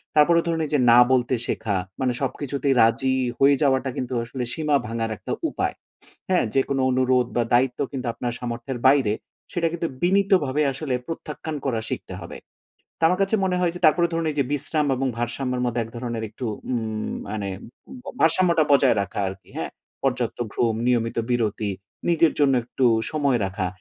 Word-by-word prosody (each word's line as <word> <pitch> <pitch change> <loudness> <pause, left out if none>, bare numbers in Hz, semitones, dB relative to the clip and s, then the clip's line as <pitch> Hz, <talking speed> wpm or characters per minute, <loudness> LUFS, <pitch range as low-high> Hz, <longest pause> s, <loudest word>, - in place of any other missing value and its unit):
তারপরে 170 +3 +5
ধরুন 165 -1 0
ঐযে 150 -1 0
না 120 - +8
বলতে 130 0 +2
শেখা, 105 -3 -1 0.2
মানে 130 -1 +1
সবকিছুতেই 140 +1 -1
রাজি 130 +4 +3 0.2
হয়ে 140 +1 +6
যাওয়াটা 135 -2 +2
কিন্তু 130 0 -3
আসলে 125 +2 -5
সীমা 150 -2 +1
ভাঙার 115 0 -2
একটা - - -7 0.2
উপায়। - - -2 0.6
হ্যাঁ? 185 -1 +3
যেকোনো 135 0 +1
অনুরোধ 130 -1 +2
বা 120 - +3
দায়িত্ব 125 +1 +3
কিন্তু 130 -2 -4
আপনার 120 +1 -3
সামর্থ্যের 120 +1 -4
বাইরে, 135 -6 +4 0.4
সেটা 170 -1 +1
কিন্তু 170 0 -2 0.2
বিনীতভাবে 180 -6 +3
আসলে 135 -1 -3
প্রত্যাখ্যান 160 -1 -5
করা 120 -4 0
শিখতে - - -5
হবে। - - -8 0.6
তো - - -24
আমার 180 +2 +1
কাছে 195 +3 +1
মনে 180 -1 +1
হয় 175 -2 +1
যে 175 - -7
তারপরে 170 +3 +4
ধরুন 165 0 -1
এই 150 - -7
যে, 140 - +3
বিশ্রাম 150 +1 0
এবং 135 +1 -1
ভারসাম্যের 125 +1 -2
মধ্যে 120 -1 0
এক 110 - -11
ধরনের 120 -2 -4
একটু 115 +4 -8 0.3
উম 110 -3 -2 0.2
মানে 105 -2 -3 0.7
ভারসাম্যটা 165 0 +4
বজায় 135 -4 +5
রাখা 100 +1 -4
আর 95 - -5
কি, - - -27
হ্যাঁ? - - -3 0.3
পর্যাপ্ত 125 -3 -1 0.2
ঘুম, 115 -2 +1
নিয়মিত 115 -2 +1
বিরতি, 110 -3 0 0.4
নিজের 165 -1 +4
জন্য 140 -2 +4
একটু 125 +2 -2 0.3
সময় 145 -5 +1
রাখা। 95 0 -3
130 Hz, 170 wpm, -24 LUFS, 120-155 Hz, 0.7 s, না